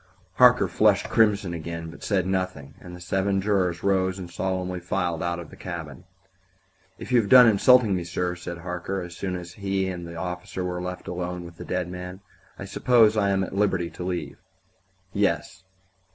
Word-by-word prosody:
Harker 125 -5 +6
flushed 100 +3 +2
crimson 105 -5 +2
again, 85 0 -6
but - - -14
said 95 -4 0
nothing, 95 -7 -3
and 90 -1 -10
the - - -11
seven 95 +2 0
jurors 95 -3 0
rose 95 -1 +1
and 90 -2 -8
solemnly 90 0 -2
filed 90 -2 -2
out 85 0 -1
of 85 -3 -9
the - - -11
cabin. - - -7 0.9
"If - - -9
you 120 -2 +5
have 100 - -6
done 125 -1 +9
insulting 110 0 +5
me, 90 - -2
sir," 90 +1 -2
said 90 -1 -7
Harker, 90 +2 -4
as 90 -1 -9
soon 95 0 -3
as 85 -1 -7
he 95 -1 -1
and 85 -2 -6
the 85 - -9
officer 90 +1 -5
were 90 -1 -3
left 90 0 -6
alone 90 0 -4
with 85 0 -12
the - - -8
dead 90 -1 -2
man, 90 +1 -7 0.4
"I 100 - -7
suppose 110 +2 +4
I 100 -2 +2
am 95 -1 +1
at 95 - -6
liberty 95 -4 0
to 90 -1 -4
go?" - - -19 0.8
"Yes." 95 - -1
90 Hz, 190 wpm, -25 LUFS, 90-100 Hz, 0.9 s, done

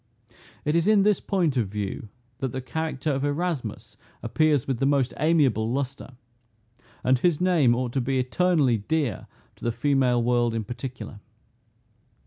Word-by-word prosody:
It 150 +2 +1
is 170 +2 +2
in 210 -2 +5
this 210 -1 +3
point 170 -9 0
of 115 -5 +1
view 105 +1 -5 0.3
that 130 -2 -2
the 130 - -4
character 155 +2 -3
of 135 0 -1
Erasmus 145 - -3 0.3
appears 155 -5 +2
with 130 -4 -1
the 135 - +2
most 140 -3 +1
amiable 135 -9 +2
lustre; 135 0 -4 0.9
and 130 0 +3
his 170 +1 +2
name 165 -10 +3
ought 125 -1 -2
to 135 - +1
be 130 +2 -1
eternally 135 - +2
dear 140 -1 -2 0.3
to - - -16
the 120 - +1
female 125 -1 +1
world 120 -1 +1
in 110 - -1
particular. 120 -1 -7
135 Hz, 155 wpm, -25 LUFS, 120-155 Hz, 0.9 s, in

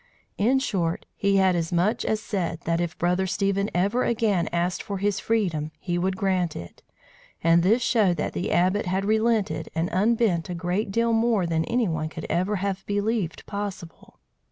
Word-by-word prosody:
In 240 +6 +3
short, 180 -11 -1
he 200 -1 +1
had 190 -2 +4
as 165 -1 -1
much 185 +7 +1
as 215 - 0
said 180 -6 -3
that 165 +1 0
if 170 -2 -3
Brother 180 +2 +1
Stephen 200 +1 0
ever 200 +8 +1
again 215 -6 +1
asked 175 +1 -1
for 200 - -4
his 200 +1 0
freedom, 180 -11 0
he 175 -2 -2
would 190 +1 -1
grant 185 -4 0
it; 85 0 -9 0.6
and 165 +1 +5
this 220 +8 +3
showed 205 -9 +2
that - - -2
the 180 - -2
Abbot 185 +3 +2
had 190 +2 0
relented 215 -7 +1
and 165 +2 0
unbent 205 -4 +1
a 175 - -3
great 180 +5 -1
deal 230 +2 +1
more 225 -4 +2
than 165 -1 0
any 235 -2 +1
one 155 -2 -2
could 160 0 -7
ever 185 +6 +1
have 195 0 -2
believed 205 -3 -1
possible. 200 -5 -7
190 Hz, 180 wpm, -25 LUFS, 175-210 Hz, 0.6 s, and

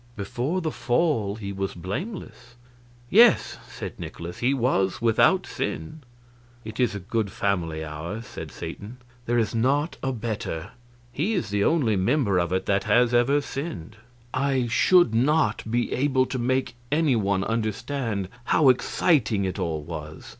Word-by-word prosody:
"Before 125 - -2
the 160 -2 -2
Fall 120 -8 0
he 100 -3 -6
was 95 0 -3
blameless." 120 - -6 0.6
"Yes," 230 +1 +5
said - - -7
Nikolaus, 85 +1 -7
"he 125 +2 +2
was 115 -8 +1
without 115 -1 +3
sin." 80 - -4 0.6
"It 110 +2 -8
is 120 -5 +2
a - - -3
good 105 +1 -2
family 85 -7 -1
ours," 85 +9 -6
said - - -8
Satan; 110 +5 -8 0.3
"there 120 +1 +2
is 110 -3 +1
not 140 +7 +1
a 135 - -1
better. 110 -7 -4 0.4
He 180 - -1
is 110 - -2
the 100 0 +1
only 130 -9 +2
member 100 -1 +2
of 85 0 -1
it 95 0 0
that 100 -1 +1
has 120 0 +3
ever 130 +5 +3
sinned." 110 - -6 0.4
I 135 -1 +1
should 120 +5 +4
not 135 0 +2
be 120 +1 0
able 130 -1 +2
to 130 - -4
make 130 +1 0 0.2
any 150 -3 +3
one 100 -3 +1
understand 115 -1 -2 0.2
how 140 +1 +4
exciting 125 - +2
it 95 - -3
all 80 -3 -2
was. 75 -1 -8
115 Hz, 155 wpm, -25 LUFS, 100-135 Hz, 0.6 s, Yes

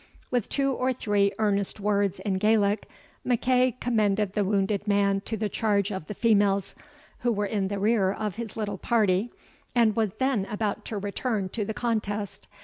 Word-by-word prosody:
With 245 -4 0
two 275 -1 +1
or 255 0 0
three 205 -4 +1
earnest 205 -1 0
words 200 -1 +1
in 190 -3 -1
Gaelic, 210 0 +2 0.3
MacEagh 250 0 +2
commended 210 -4 +1
the 210 - +1
wounded 200 +1 0
man 200 -1 +2
to 225 - -2
the 215 0 -1
charge 205 -1 0
of 190 -6 -5
the 210 - -6
females, 200 -3 +2 0.5
who 240 - +1
were 205 -2 0
in 200 -2 -1
the 200 +1 -3
rear 200 -1 +2
of 210 0 -4
his 230 -2 -6
little 205 -3 -3
party, 215 -1 +1 0.4
and 225 -3 +4
was 220 -2 +1
then 260 -7 +1
about 210 +1 -3
to 220 - -4
return 205 0 -2
to 210 +1 -2
the 220 - -4
contest. 210 -4 -2
210 Hz, 175 wpm, -27 LUFS, 200-225 Hz, 0.5 s, and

